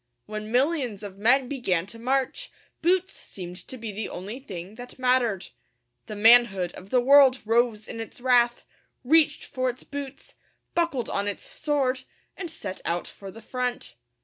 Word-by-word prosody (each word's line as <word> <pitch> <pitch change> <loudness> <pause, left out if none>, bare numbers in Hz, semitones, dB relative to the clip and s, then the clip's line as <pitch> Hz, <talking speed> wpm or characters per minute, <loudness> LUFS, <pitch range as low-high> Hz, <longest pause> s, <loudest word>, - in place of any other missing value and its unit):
When 215 0 -6
millions 250 - +1
of 195 -1 -8
men 250 +5 +4
began 195 -11 0
to 230 +4 -10
march, 265 - -1 0.3
boots 370 +3 +2
seemed 180 -2 -9
to 260 - -8
be 225 -2 -5
the 205 +1 -4
only 205 +8 -6
thing 190 -6 -8
that 245 +2 -10
mattered. 250 -7 +1 0.6
The 215 - -6
manhood 210 -5 +5
of 190 - -12
the 250 - +3
world 265 0 +6
rose 225 -1 +1
in 225 - -6
its 225 - -9
wrath, 245 -1 +3 0.4
reached 310 +4 +3
for 255 -1 -1
its 250 +1 -7
boots, 280 -1 -8 0.4
buckled 335 -9 0
on 200 +1 -1
its 205 - -4
sword, 275 -4 -1 0.3
and 355 -3 -5
set 200 -12 -6
out 170 +1 -1
for 195 - -10
the 225 +3 -12
front. 250 - -3
245 Hz, 165 wpm, -26 LUFS, 205-265 Hz, 0.6 s, world